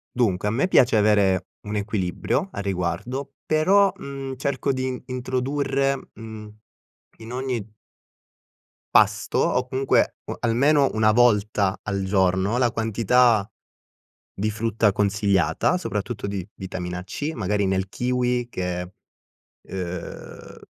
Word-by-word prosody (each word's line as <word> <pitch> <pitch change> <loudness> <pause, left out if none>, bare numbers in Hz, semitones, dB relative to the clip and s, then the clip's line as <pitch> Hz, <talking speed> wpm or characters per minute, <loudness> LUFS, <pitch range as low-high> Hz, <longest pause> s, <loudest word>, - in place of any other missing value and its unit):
Dunque, 105 -6 +1
a - - +1
me 130 +10 +1
piace 125 -10 +4
avere 100 -3 +3 0.2
un 105 - -3
equilibrio 100 -3 -1
a - - -5
riguardo, 100 +9 -3
però, 190 +6 +4
mhmm, 135 -1 -6
cerco 140 +1 -1
din 130 -1 -3
introdurre, 135 +2 -1 0.2
mhmm, 110 -1 -10 0.6
in 110 +1 -9
ogni 125 -5 -3 1.2
pasto, - - +3
o 125 0 +1
comunque 130 +1 +1
o - - -5
almeno 135 +5 +3
1 110 0 +4
volta 105 -4 +3
al 100 -2 -2
giorno, 95 +2 +2
la 125 -2 +2
quantità 115 -1 +3 0.9
di 105 +2 -1
frutta 110 -1 +1
consigliata, 100 - +1
soprattutto 105 - -3
di 100 -3 -4
vitamina 90 -2 -5
C, 145 - -4
magari 105 -1 0
nel 95 0 0
kiwi, 125 +2 -1
che, 90 -1 -4 0.8
uhm, 90 -2 -7
110 Hz, 115 wpm, -24 LUFS, 100-125 Hz, 1.2 s, piace